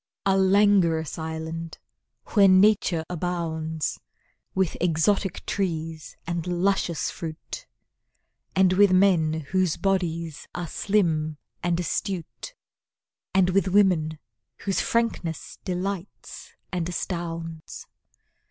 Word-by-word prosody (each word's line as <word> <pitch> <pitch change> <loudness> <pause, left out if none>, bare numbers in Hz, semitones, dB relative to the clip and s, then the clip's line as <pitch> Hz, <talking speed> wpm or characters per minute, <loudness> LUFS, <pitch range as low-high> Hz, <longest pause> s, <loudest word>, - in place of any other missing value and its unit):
A 195 - +4
langorous 190 -5 +3
island, 160 +1 -5 0.6
where 200 -3 +7
Nature 185 -3 +4
abounds 160 -3 -2 0.6
With 190 -3 +1
exotic 180 +3 +1
trees 165 -5 -3
and 170 0 -3
luscious 180 -2 0
fruit; 160 -2 -7 0.9
And 190 -1 +5
with 200 +1 +5
men 170 -5 +3
whose 185 -3 +2
bodies 170 -5 -1
are 175 - -3
slim 160 -5 0 0.2
and 175 -1 0
astute, 180 - -3 0.8
And 185 -1 +4
with 195 +1 +2
women 180 -5 +3 0.4
whose 195 -1 0
frankness 230 -8 -1
delights 185 +1 -5 0.2
and 175 -2 -2
astounds. 165 -2 -5
175 Hz, 95 wpm, -25 LUFS, 160-195 Hz, 0.9 s, where